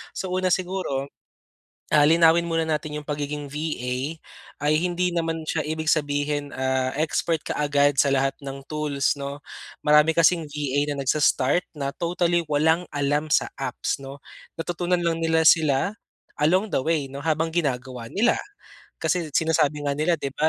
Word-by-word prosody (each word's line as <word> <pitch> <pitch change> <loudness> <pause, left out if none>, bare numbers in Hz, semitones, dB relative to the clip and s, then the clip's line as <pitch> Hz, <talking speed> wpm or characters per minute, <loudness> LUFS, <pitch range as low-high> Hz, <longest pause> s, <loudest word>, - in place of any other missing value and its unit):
Sa 185 -1 -4
una 185 0 0
siguro, 180 -7 -1 0.8
ah, 150 - +6
linawin 165 +2 +5
muna 165 -1 0
natin 150 -1 -2
'yong 150 - -14
pagiging 145 0 -3
VA 145 -4 -3 0.7
ay 150 - +4
hindi 180 0 -1
naman 165 -1 -2
siya 155 -1 -1
ibig 160 +1 -4
sabihin, 145 -1 0
ah, 130 0 0
expert 160 +1 0
kaagad 145 -1 +2
sa 140 0 +3
lahat 135 0 +1
ng 135 0 -7
tools, 150 -3 0
'no. 140 0 -6 0.4
Marami 150 +2 +5
kasing 165 +1 +3
VA 145 0 -1
na 140 - -4
nagsa-start 145 +3 +2
na 140 -1 -4
totally 175 0 0
walang 160 +4 +3
alam 145 +2 -1
sa - - +3
apps, - - -2
'no, 135 +1 -9 0.4
natutunan 175 +1 -1
lang 165 -1 -1
nila 160 0 +3
sila 155 +4 +3 0.5
along 185 +7 +3
the - - +3
way, 155 -3 0
'no, 140 +1 -8
habang 160 0 +1
ginagawa 125 -6 -2
nila. 230 +4 +3 0.6
Kasi 175 -3 -1
sinasabi 150 -2 +1
nga 140 - +1
nila, 160 +2 +1
'di 140 -2 -4
ba, 155 +1 +2
150 Hz, 155 wpm, -24 LUFS, 140-165 Hz, 0.8 s, ah